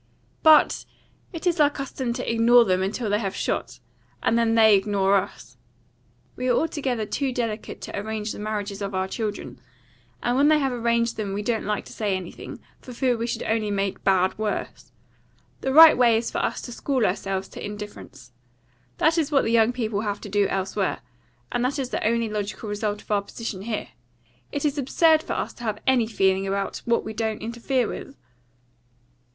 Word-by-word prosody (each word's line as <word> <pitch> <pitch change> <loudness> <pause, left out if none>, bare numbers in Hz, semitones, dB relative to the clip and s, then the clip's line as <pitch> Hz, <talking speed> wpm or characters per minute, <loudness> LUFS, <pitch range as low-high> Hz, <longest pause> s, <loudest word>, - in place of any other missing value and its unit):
But 310 -1 +5 0.5
it 330 -2 -7
is 345 -2 +1
our 295 -1 +6
custom 275 -3 -4
to - - -5
ignore 230 +1 +5
them 185 -2 +1
until 210 +5 -2
they 205 0 +1
have 195 -4 -3
shot, 120 +1 -3 0.4
and - - +2
then 230 -1 +2
they 220 -2 +7
ignore 195 0 +2
us. 195 - -3 0.8
We 255 - -3
are 245 - +4
altogether 270 -8 -1
too 270 +5 -2
delicate 230 -3 -4
to - - -6
arrange 215 +1 -3
the - - -7
marriages 210 -1 -4
of 200 -1 -3
our 190 0 0
children; 210 +1 -5 0.6
and 245 - +1
when 280 +3 +4
they 310 0 +5
have 270 -3 0
arranged 235 -1 0
them 205 -3 -3
we 205 +1 -3
don't 225 -2 -1
like 210 -1 -2
to - - -11
say 205 -3 -1
anything, 180 -2 -9 0.2
for 250 - -10
fear 250 0 +1
we 230 0 -3
should - - -3
only 220 -1 0
make 195 -1 -2
bad 190 -1 +2
worse. 215 -1 -4 0.7
The 265 - -2
right 320 +3 +9
way 235 -3 +4
is 230 - -2
for - - -2
us - - -1
to 245 - -7
school 255 -1 0
ourselves 195 0 -2
to - - -9
indifference. 205 - -9 0.7
That 325 - +3
is 310 -2 -1
what 275 -2 +3
the 225 - 0
young 230 0 +4
people 220 -5 -2
have 205 -2 -3
to 205 - -8
do 205 0 +2
elsewhere, 195 0 -2 0.5
and 245 - 0
that 260 +4 0
is 265 -2 -3
the - - -2
only 230 +1 +1
logical 210 0 -4
result 205 0 -3
of - - -11
our 205 -1 +3
position 200 -1 -6
here. 215 +1 -4 0.6
It 285 - -2
is 290 0 0
absurd 315 +4 +4
for - - -4
us - - -3
to 240 - -12
have 215 -3 -2
any 250 -4 +3
feeling 195 -3 +1
about 195 0 -2
what 235 0 +1
we 220 - -5
don't 220 -1 -3
interfere 235 +2 -1
with." 275 - -7
220 Hz, 195 wpm, -24 LUFS, 205-250 Hz, 0.8 s, right